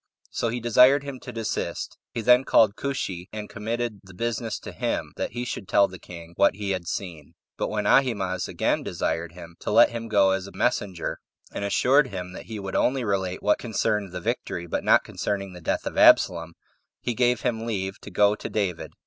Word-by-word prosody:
So 115 - -1
he 120 +2 -2
desired 125 +4 +5
him 140 -2 -7
to - - -8
desist. 115 -2 -4
He 120 - -3
then 125 +3 +5
called 110 -5 +4
Cushi, 95 -11 -3
and 105 -1 -6
committed 115 0 -3
the 95 -2 -15
business 115 +2 -2
to - - -8
him, - - -3
that - - -4
he 120 +1 -3
should 105 -5 -5
tell 100 +1 +4
the 95 -1 -11
king 85 -1 -11
what 100 -1 +4
he 100 -1 -3
had 90 -3 -3
seen. 85 -7 -6 0.2
But - - -2
when 105 -1 -2
Ahimaaz 100 -8 +2
again - - 0
desired 80 0 -3
him 85 -1 -12
to - - -5
let 115 +3 +6
him 115 -1 -5
go 100 -3 +4
as 95 0 -1
a - - -10
messenger, 100 -8 -1 0.3
and - - -4
assured 130 +8 +3
him 90 -4 -6
that - - -9
he 110 -2 -6
would 95 -1 -5
only 130 0 +2
relate 95 -4 -2
what 105 - +3
concerned 105 -4 -1
the 90 - -5
victory, 85 0 -3
but 85 - -3
not - - +5
concerning 100 -2 -3
the 90 - -11
death - - -1
of - - -2
Absalom, 85 0 +5 0.4
he 120 - -2
gave 125 +1 +2
him 115 -2 -2
leave 95 -3 -3
to - - -9
go 105 0 +4
to - - -6
David. 95 -6 -2
105 Hz, 210 wpm, -25 LUFS, 95-120 Hz, 0.4 s, let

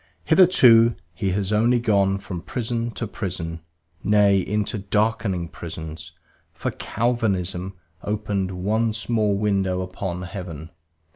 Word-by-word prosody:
Hitherto 120 -11 +6 0.2
he 95 +4 -2
has 100 +1 -1
only 120 +3 +3
gone 100 -4 +2
from 95 -3 -6
prison 120 +1 -3
to 120 - -3
prison, 85 -5 -4 0.4
nay, 100 -1 +4
into 105 +3 -1
darkening 105 -3 0
prisons, 80 -1 -8 0.4
for - - -3
Calvinism 95 -6 -1 0.3
opened 100 -2 -2
one 110 +2 +1
small 105 -1 0
window 95 -3 0
upon 90 -1 -5
heaven. 85 -4 -7
100 Hz, 115 wpm, -23 LUFS, 95-110 Hz, 0.4 s, Hitherto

